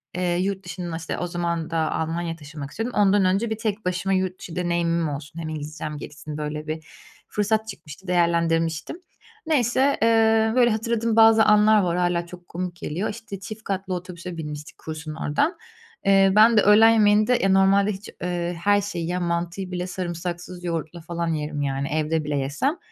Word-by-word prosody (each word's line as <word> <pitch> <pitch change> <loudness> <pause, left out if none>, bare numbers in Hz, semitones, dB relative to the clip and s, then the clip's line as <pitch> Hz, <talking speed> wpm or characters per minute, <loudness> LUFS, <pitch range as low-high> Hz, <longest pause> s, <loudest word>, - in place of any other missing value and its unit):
eee, 180 -1 0
yurt 190 0 -2
dışında, 175 -1 -5
işte, 165 0 -5
o 180 - -2
zaman 170 -2 -2
da 165 - -2
Almanya'ya 165 +1 -2
taşınmak 145 -2 -9
istiyordum, 225 0 -3
ondan 200 -1 +4
önce 195 +5 +1
bir 220 - -2
tek 215 -3 -3
başıma 180 +2 0
yurt 185 -1 -1
dışı 170 - -9
deneyimim 170 -2 0
olsun, 145 +3 -7
hem 160 -1 -4
İngilizcem 155 0 -5
gelişsin, 150 +1 -8
böyle, 150 +1 -4
bir 155 0 -4 0.4
fırsat 215 +1 0
çıkmıştı, 190 -3 -10
değerlendirmiştim. 170 - +1 0.5
Neyse, 270 -2 +2
eee, 225 -1 +4
böyle, 245 -2 +5
hatırladığım 230 0 0
bazı 225 0 +7
anlar 210 0 +5
var, 175 -1 0
hâlâ 175 -1 +1
çok 175 0 -12
komik 180 0 -5
geliyor. 175 +4 -3
İşte, 205 -2 -7
çift 215 +2 -8
katlı 190 -2 -3
otobüse 180 -1 -6
binmiştik 150 -1 -7
kursun 155 -1 -7
oradan. 165 - 0 0.5
Eee, 195 -1 +5
ben 220 +2 +6
de 210 - +7
öğlen 215 +2 +7
yemeğinde 215 +1 +4
ya 195 - +3
normalde 195 +2 +4
hiç, 195 +1 -8
eee, 175 -1 -2
her 205 0 +4
şeyi 195 -4 -4
yiyen 175 +2 -2
mantıyı 175 +2 -2
bile 180 0 -3
sarımsaksız 175 0 -5
yoğurtla 170 -1 -4
falan 170 +1 -3
yerim, 150 -2 -2
yani, 140 0 -1
evde 155 +1 0
bile 150 -1 -2
yesem. 150 - -1
180 Hz, 175 wpm, -24 LUFS, 165-205 Hz, 0.5 s, bazı